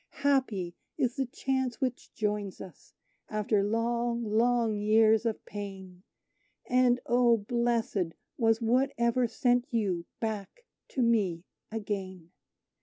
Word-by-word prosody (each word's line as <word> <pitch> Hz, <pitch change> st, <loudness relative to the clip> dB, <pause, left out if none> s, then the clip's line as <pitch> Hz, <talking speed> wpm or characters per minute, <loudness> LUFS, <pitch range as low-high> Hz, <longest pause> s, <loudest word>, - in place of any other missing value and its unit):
Happy 230 Hz, -11 st, +1 dB, 0.2 s
is 245 Hz, -1 st, 0 dB
the 265 Hz, -2 st, -1 dB
chance 260 Hz, -1 st, -2 dB
which 255 Hz, -2 st, -3 dB
joins 210 Hz, -2 st, -2 dB
us 180 Hz, -6 st, -12 dB, 0.3 s
after 210 Hz, -1 st, +1 dB
long, 235 Hz, +3 st, 0 dB
long 230 Hz, +1 st, +2 dB
years 220 Hz, +2 st, +4 dB
of 220 Hz, -, -3 dB
pain: 190 Hz, -3 st, -8 dB, 0.7 s
And, 250 Hz, -1 st, +4 dB
oh, 240 Hz, -1 st, +4 dB
blessed 225 Hz, -5 st, 0 dB, 0.2 s
was 225 Hz, -1 st, +2 dB
whatever 240 Hz, 0 st, +2 dB
sent 245 Hz, +1 st, +1 dB
you 190 Hz, -7 st, -1 dB
back 220 Hz, -, -4 dB, 0.2 s
to 260 Hz, -, -1 dB
me 200 Hz, -8 st, +1 dB, 0.3 s
again! 190 Hz, -5 st, -5 dB
225 Hz, 110 wpm, -29 LUFS, 205-240 Hz, 0.7 s, years